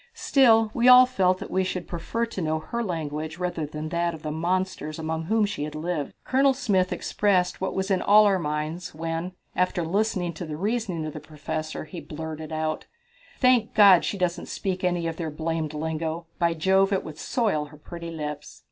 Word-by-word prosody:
Still, 225 Hz, -, +4 dB
we 240 Hz, +1 st, +2 dB
all 250 Hz, 0 st, +10 dB
felt 185 Hz, -7 st, +2 dB
that -, -, -8 dB
we 190 Hz, -, +2 dB
should 185 Hz, -1 st, -3 dB
prefer 205 Hz, +7 st, -2 dB
to 230 Hz, -5 st, -6 dB
know 155 Hz, -1 st, 0 dB
her 235 Hz, +9 st, -4 dB
language 160 Hz, -4 st, -4 dB
rather 175 Hz, -4 st, -2 dB
than 155 Hz, +1 st, -5 dB
that 170 Hz, 0 st, 0 dB
of 155 Hz, -, -13 dB
the 155 Hz, -, -3 dB
monsters 170 Hz, -1 st, -2 dB
among 160 Hz, 0 st, -3 dB
whom 220 Hz, +3 st, +2 dB
she 205 Hz, -7 st, -4 dB
had 150 Hz, 0 st, -5 dB
lived. 155 Hz, -2 st, -3 dB
Colonel 270 Hz, +1 st, +3 dB
Smith 195 Hz, -9 st, +1 dB
expressed 185 Hz, -4 st, +1 dB
what 190 Hz, -, -2 dB
was 190 Hz, +1 st, -1 dB
in 190 Hz, -, +2 dB
all 210 Hz, +1 st, +6 dB
our 195 Hz, -2 st, +3 dB
minds 155 Hz, +2 st, -3 dB
when, 165 Hz, +3 st, -3 dB, 0.2 s
after 180 Hz, -2 st, 0 dB
listening 185 Hz, -1 st, 0 dB
to 165 Hz, +2 st, -6 dB
the 150 Hz, -1 st, -5 dB
reasoning 200 Hz, -4 st, -2 dB
of 155 Hz, -, -5 dB
the 155 Hz, -, -6 dB
Professor, 155 Hz, +1 st, -5 dB
he 165 Hz, +2 st, -8 dB
blurted 160 Hz, 0 st, -7 dB
out: 155 Hz, 0 st, -2 dB, 0.5 s
"Thank 250 Hz, -4 st, +3 dB
God, 195 Hz, -4 st, +8 dB
she 200 Hz, -, -2 dB
doesn't 180 Hz, -2 st, -1 dB
speak 185 Hz, -1 st, -3 dB
any 175 Hz, -2 st, 0 dB
of 165 Hz, -1 st, -3 dB
their 165 Hz, -2 st, -3 dB
blamed 155 Hz, 0 st, -3 dB
lingo! 160 Hz, +2 st, -3 dB
By 170 Hz, -1 st, +2 dB
Jove, 190 Hz, +4 st, +3 dB
it 195 Hz, -, +1 dB
would 155 Hz, 0 st, -9 dB
soil 205 Hz, -12 st, 0 dB
her 150 Hz, +1 st, -14 dB
pretty 170 Hz, +2 st, -8 dB
lips." 150 Hz, -2 st, -6 dB
170 Hz, 200 wpm, -25 LUFS, 155-195 Hz, 0.5 s, all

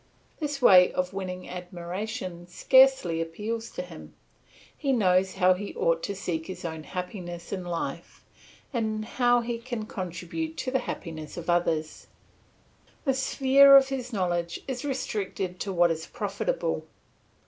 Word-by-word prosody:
This 290 Hz, -4 st, -3 dB
way 180 Hz, -5 st, +8 dB
of 180 Hz, +1 st, -1 dB
winning 185 Hz, -1 st, -5 dB
admiration 180 Hz, +1 st, -6 dB
scarcely 260 Hz, -5 st, +4 dB
appeals 215 Hz, +8 st, -4 dB
to 180 Hz, -, -5 dB
him; 170 Hz, -3 st, -12 dB, 0.6 s
he 280 Hz, -3 st, -1 dB
knows 190 Hz, -5 st, +3 dB
how 185 Hz, -1 st, +5 dB
he 200 Hz, +2 st, -6 dB
ought 165 Hz, 0 st, +1 dB
to 200 Hz, -, -3 dB
seek 165 Hz, -4 st, -3 dB
his 185 Hz, -, -7 dB
own 160 Hz, -2 st, -5 dB
happiness 180 Hz, -2 st, -6 dB
in 185 Hz, -2 st, -3 dB
life, 175 Hz, -1 st, -5 dB, 0.5 s
and 215 Hz, -2 st, -1 dB
how 245 Hz, 0 st, +3 dB
he 235 Hz, 0 st, -3 dB
can 235 Hz, -2 st, -5 dB
contribute 185 Hz, -, -5 dB
to 255 Hz, -, -2 dB
the 265 Hz, -, +2 dB
happiness 155 Hz, -2 st, -6 dB
of 170 Hz, 0 st, -1 dB
others. 160 Hz, -3 st, -1 dB, 1.0 s
The 270 Hz, -, +3 dB
sphere 275 Hz, +1 st, +6 dB
of 270 Hz, 0 st, +4 dB
his 260 Hz, -2 st, -4 dB
knowledge 175 Hz, -4 st, -1 dB
is 255 Hz, -2 st, -4 dB
restricted 200 Hz, -9 st, -3 dB
to 200 Hz, -, -3 dB
what 175 Hz, -2 st, +4 dB
is 160 Hz, 0 st, -4 dB
profitable. 215 Hz, -, -2 dB
190 Hz, 145 wpm, -27 LUFS, 175-245 Hz, 1.0 s, way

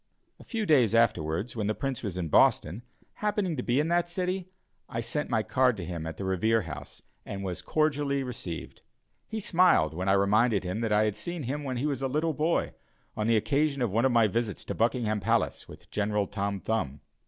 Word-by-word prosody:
A -, -, -12 dB
few 225 Hz, -3 st, -3 dB
days 125 Hz, -, +4 dB
afterwards, 105 Hz, -2 st, +1 dB
when 105 Hz, -3 st, -1 dB
the 110 Hz, -, 0 dB
Prince 135 Hz, -3 st, -3 dB
was 100 Hz, -5 st, -4 dB
in 90 Hz, -3 st, -2 dB
Boston, 80 Hz, +5 st, +3 dB, 0.4 s
happening 205 Hz, -5 st, 0 dB
to 125 Hz, -, -2 dB
be 125 Hz, +2 st, +1 dB
in 150 Hz, -, +1 dB
that 175 Hz, 0 st, +2 dB
city, 185 Hz, +1 st, -2 dB, 0.4 s
I 115 Hz, -, -3 dB
sent 150 Hz, +6 st, -2 dB
my 110 Hz, -, +1 dB
card 125 Hz, -2 st, +2 dB
to 90 Hz, -, -5 dB
him 85 Hz, -2 st, -5 dB
at 80 Hz, -, -6 dB
the 100 Hz, -, -4 dB
Revere 105 Hz, +4 st, +2 dB
House, 80 Hz, -3 st, -9 dB, 0.2 s
and 100 Hz, 0 st, -6 dB
was 90 Hz, -1 st, -4 dB
cordially 145 Hz, -, 0 dB
received. 100 Hz, -10 st, -6 dB, 0.5 s
He 220 Hz, -, -4 dB
smiled 175 Hz, -, +3 dB
when 90 Hz, +4 st, -2 dB
I -, -, +5 dB
reminded 105 Hz, +2 st, +3 dB
him 95 Hz, +5 st, -3 dB
that 115 Hz, -2 st, -1 dB
I 105 Hz, 0 st, +4 dB
had 105 Hz, -2 st, -1 dB
seen 170 Hz, +9 st, -5 dB
him 145 Hz, +4 st, -3 dB
when 130 Hz, -3 st, -3 dB
he 130 Hz, -, -1 dB
was 140 Hz, -3 st, -1 dB
a 135 Hz, -, +1 dB
little 155 Hz, +4 st, 0 dB
boy, 155 Hz, +3 st, 0 dB, 0.4 s
on 105 Hz, 0 st, -1 dB
the 115 Hz, -1 st, +4 dB
occasion 140 Hz, +3 st, +1 dB
of 115 Hz, -, 0 dB
one 115 Hz, +5 st, +2 dB
of 130 Hz, -, +3 dB
my 115 Hz, -2 st, +5 dB
visits 115 Hz, 0 st, -2 dB
to -, -, -3 dB
Buckingham 115 Hz, -2 st, +1 dB
Palace 115 Hz, +3 st, 0 dB
with -, -, -14 dB
General 105 Hz, 0 st, 0 dB
Tom 100 Hz, 0 st, -3 dB
Thumb. 75 Hz, -12 st, -2 dB
115 Hz, 215 wpm, -28 LUFS, 100-145 Hz, 0.5 s, I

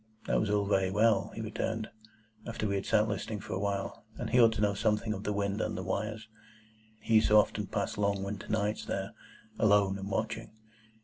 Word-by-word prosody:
That -, -, +2 dB
was 105 Hz, -, 0 dB
all 105 Hz, -1 st, +2 dB
very 95 Hz, -2 st, +2 dB
well, 105 Hz, -1 st, +3 dB
he 110 Hz, -, -4 dB
returned, 110 Hz, 0 st, -3 dB, 0.6 s
after 115 Hz, -2 st, -2 dB
we 100 Hz, -, -1 dB
had 100 Hz, -1 st, -2 dB
sat 110 Hz, -1 st, +3 dB
listening 105 Hz, +1 st, -3 dB
for -, -, -6 dB
a -, -, -1 dB
while, 100 Hz, -1 st, -3 dB
and -, -, -4 dB
he 125 Hz, -, +6 dB
ought 115 Hz, -1 st, +7 dB
to 110 Hz, -, -3 dB
know 105 Hz, -1 st, +3 dB
something 105 Hz, +2 st, 0 dB
of 100 Hz, 0 st, -7 dB
the 105 Hz, -, 0 dB
wind 100 Hz, +1 st, -1 dB
and -, -, -2 dB
the -, -, -4 dB
wires,—he 110 Hz, +1 st, -6 dB
who 110 Hz, -, +8 dB
so 105 Hz, -, +5 dB
often 105 Hz, -, +2 dB
passed -, -, -2 dB
long 100 Hz, -1 st, +1 dB
winter 100 Hz, +1 st, -5 dB
nights 105 Hz, 0 st, -1 dB
there, -, -, -3 dB, 0.5 s
alone 100 Hz, -2 st, +4 dB
and 95 Hz, +1 st, -5 dB
watching. 110 Hz, +3 st, -2 dB
105 Hz, 205 wpm, -31 LUFS, 100-110 Hz, 0.6 s, who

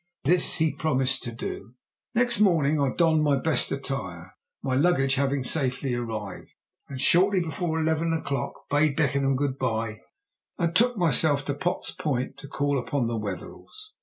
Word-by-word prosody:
This 175 Hz, +5 st, +3 dB
he 160 Hz, -2 st, +1 dB
promised 135 Hz, -4 st, 0 dB
to 120 Hz, -, -4 dB
do. 115 Hz, +1 st, -7 dB, 0.4 s
Next 240 Hz, -1 st, +3 dB
morning 155 Hz, -7 st, +3 dB
I 140 Hz, -, +2 dB
donned 160 Hz, -2 st, +3 dB
my 145 Hz, -2 st, +3 dB
best 155 Hz, +3 st, 0 dB
attire 95 Hz, -11 st, -5 dB, 0.3 s
(my 130 Hz, -, -1 dB
luggage 135 Hz, -2 st, +2 dB
having 135 Hz, 0 st, 0 dB
safely 130 Hz, -2 st, -1 dB
arrived), 110 Hz, -5 st, -5 dB, 0.3 s
and 135 Hz, -2 st, -6 dB
shortly 190 Hz, +7 st, +4 dB
before 160 Hz, 0 st, -2 dB
eleven 160 Hz, +1 st, 0 dB
o'clock 140 Hz, -3 st, -3 dB
bade 145 Hz, 0 st, +2 dB
Beckenham 140 Hz, -2 st, +1 dB
good 135 Hz, 0 st, -2 dB
bye 115 Hz, -3 st, -2 dB, 0.6 s
and 170 Hz, -1 st, 0 dB
betook 240 Hz, +4 st, +3 dB
myself 150 Hz, -4 st, +2 dB
to 140 Hz, -, -1 dB
Potts 175 Hz, +5 st, -2 dB
Point 130 Hz, -5 st, -3 dB
to 145 Hz, -, -10 dB
call 140 Hz, 0 st, -1 dB
upon 130 Hz, 0 st, -1 dB
the 115 Hz, 0 st, -2 dB
Wetherells. 110 Hz, -, -7 dB
140 Hz, 160 wpm, -26 LUFS, 130-160 Hz, 0.6 s, shortly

